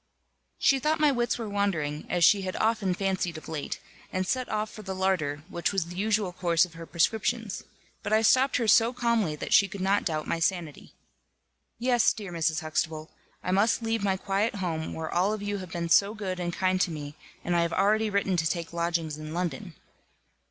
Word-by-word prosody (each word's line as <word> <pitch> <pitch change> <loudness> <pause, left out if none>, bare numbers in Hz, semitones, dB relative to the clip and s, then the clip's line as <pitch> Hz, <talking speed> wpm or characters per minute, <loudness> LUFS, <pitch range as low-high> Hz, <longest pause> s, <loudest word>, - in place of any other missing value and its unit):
She 270 - +3
thought 305 +4 +1
my 300 -1 +5
wits 240 -2 0
were 230 -2 -4
wandering, 170 -8 -1
as 175 -1 +1
she 200 +3 +5
had 185 -1 -4
often 215 -5 +1
fancied 185 -3 -1
of 155 - -11
late, 150 -3 -4 0.3
and 185 0 -1
set 255 +5 -1
off 215 0 -2
for 215 - -10
the 190 -2 -5
larder, 165 -6 0
which 170 -3 -1
was 195 -4 0
the 175 +1 -9
usual 205 -1 0
course 170 -2 +2
of 175 - -15
her 165 0 -9
prescriptions. 220 +5 0 0.4
But - - -4
I 220 +1 +4
stopped 260 +4 +4
her 235 -2 0
so 230 +3 +5
calmly 235 -10 +1
that - - -3
she 200 - +6
could 195 +1 -8
not 195 +2 +2
doubt 155 -3 -2
my 165 - -1
sanity. 165 -3 -2 0.8
"Yes, 245 -1 +3
dear 200 -4 -7
Mrs. 165 -2 0
Huxtable, 155 0 -2 0.3
I 185 - -1
must 210 +5 +2
leave 225 -2 -1
my 190 -2 +1
quiet 200 +4 -1
home, 165 -5 -3
where 160 0 -4
all 185 +4 +2
of 215 -1 -5
you 205 0 -2
have 185 -2 -8
been 170 0 -3
so 200 +5 +4
good 190 -4 -4
and 175 -1 -2
kind 185 +1 +1
to - - +2
me; 145 -3 -6 0.3
and 175 - 0
I 170 - +3
have 170 0 0
already 215 +2 +2
written 200 -2 +1
to 160 -1 +2
take 170 -2 -4
lodgings 170 -3 -1
in 155 +1 -7
London." 180 0 -3
190 Hz, 210 wpm, -27 LUFS, 170-215 Hz, 0.8 s, she